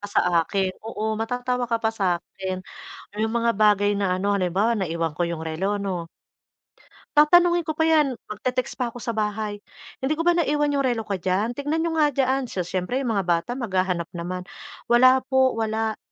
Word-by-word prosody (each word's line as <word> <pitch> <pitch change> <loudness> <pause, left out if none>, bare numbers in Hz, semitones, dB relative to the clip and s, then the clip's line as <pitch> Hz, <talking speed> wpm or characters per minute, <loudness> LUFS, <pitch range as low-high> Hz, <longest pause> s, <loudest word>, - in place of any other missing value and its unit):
pa 205 - -6
sa - - +2 0.2
akin, 190 +2 -1
oo 220 0 -3
matatawa 245 +2 -1
ka 230 - +2
pa 225 -1 0
sa 200 -4 -1
akin. 185 +1 -6 0.6
Yung 220 0 0
mga 235 0 +2
bagay 205 -1 +3
na 195 -2 0
ano 200 +2 0
halimbawa 195 +4 +1
naiwan 165 -5 -2
ko 175 - -1
yung 165 -1 -4
relo 185 +6 -1
'no? 185 -4 -3 1.1
Tatanungin 345 +2 +5
ko 315 - -2
pa 320 - 0
yan, 310 -4 +3 0.2
magte-text 255 +4 -3
pa 250 - 0
ako 235 0 -8
sa 240 - -2
bahay. 210 -1 -2 0.4
"Hindi 265 +4 0
ko 325 - -2
ba 350 - +4
naiwan 295 -4 +1
yung 275 -2 +1
relo 240 -3 0
ko 200 -3 -3
diyan? 195 +7 -1
Tignan 300 +3 -1
niyo 335 - 0
nga 295 -3 +3
diyan." 265 0 +1
So 185 -6 -3
siyempre 185 +9 -2
yung 250 - -1
mga 200 -4 0
bata 170 +5 0
maghahanap 185 -7 -1
naman. 180 +1 -5 0.4
"Wala 255 +2 +6
po, 265 -1 +3
wala." 220 0 -1
220 Hz, 190 wpm, -24 LUFS, 190-260 Hz, 1.1 s, Wala